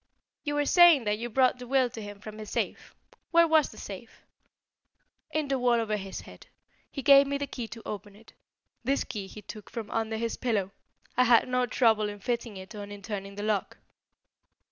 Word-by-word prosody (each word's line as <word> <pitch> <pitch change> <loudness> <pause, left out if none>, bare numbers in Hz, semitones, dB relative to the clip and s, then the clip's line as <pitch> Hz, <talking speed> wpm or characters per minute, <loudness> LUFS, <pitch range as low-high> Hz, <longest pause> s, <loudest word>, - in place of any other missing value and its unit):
"You 290 -1 -2
were 290 0 +1
saying 345 -5 +7
that 210 0 0
you 240 +1 -4
brought 255 +1 +3
the 250 - -8
will 260 0 +3
to 225 - -7
him 205 -1 -8
from 215 0 -9
his 215 -1 -7
safe. - - -3 0.3
Where 335 0 +5
was 315 -2 +4
the - - -14
safe?" - - -10 1.0
"In 310 -1 -1
the 270 -1 0
wall 245 -1 +3
over 215 -2 -1
his 195 -2 -6
head. - - -14 0.4
He 275 - -6
gave 275 +1 +7
me 280 0 -1
the 285 - -2
key 245 -4 -6
to 225 0 -10
open 205 -1 -7
it. 220 +2 -18 0.5
This 275 +3 +1
key 205 -4 -6
he 210 +2 -11
took 215 +1 -10
from 230 -3 -6
under 225 0 -1
his 230 0 -2
pillow. 210 -6 -1 0.4
I 250 - +4
had 240 0 +5
no 250 0 +1
trouble 220 -4 +3
in 205 0 -8
fitting 235 -1 -3
it 190 +3 -10
or 210 -1 -6
in 205 0 -9
turning 200 -1 -5
the 205 - -5
lock." 210 -2 -1
230 Hz, 210 wpm, -28 LUFS, 210-260 Hz, 1.0 s, saying